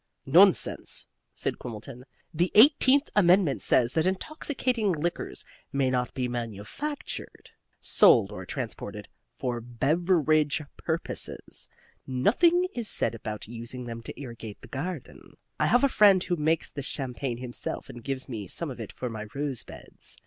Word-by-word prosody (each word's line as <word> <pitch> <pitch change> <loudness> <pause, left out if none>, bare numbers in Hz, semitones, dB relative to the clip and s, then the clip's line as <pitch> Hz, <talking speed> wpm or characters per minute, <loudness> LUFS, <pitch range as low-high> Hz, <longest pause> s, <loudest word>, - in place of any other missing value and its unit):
"Nonsense!" 180 +7 +4 0.3
said - - -2
Quimbleton. 120 +2 -8 0.3
"The 175 +3 +1
Eighteenth 275 +3 +6
Amendment 180 -6 +4
says 120 -1 +3
that 160 +2 +2
intoxicating 245 0 -1
liquors 170 +2 -2 0.3
may 135 -2 +1
not 125 -1 -1
be 125 -2 -1
manufactured, 120 - -6 0.3
sold - - +5
or - - -7
transported - - -6 0.3
FOR 120 -3 -3
BEVERAGE 155 +4 +1
PURPOSES. 165 0 -1 0.4
Nothing 330 - +3
is 235 -3 -2
said - - 0
about 110 -2 -6
using 120 +2 -7
them 115 -1 -6
to - - -9
irrigate 115 -6 -8
the - - -12
garden. 155 +1 -7 0.2
I - - +3
have 245 +3 +4
a - - +6
friend 200 -7 +5
who 175 - 0
makes 160 0 0
this 140 -2 -3
champagne 130 -2 -3
himself 125 -1 -4
and 120 -1 -10
gives 135 0 -2
me 110 -6 -6
some 160 - -4
of 125 - -9
it 110 - -6
for 125 - -5
my 110 -2 -6
rose 140 -3 0
beds. - - -10
140 Hz, 145 wpm, -27 LUFS, 120-185 Hz, 0.4 s, Eighteenth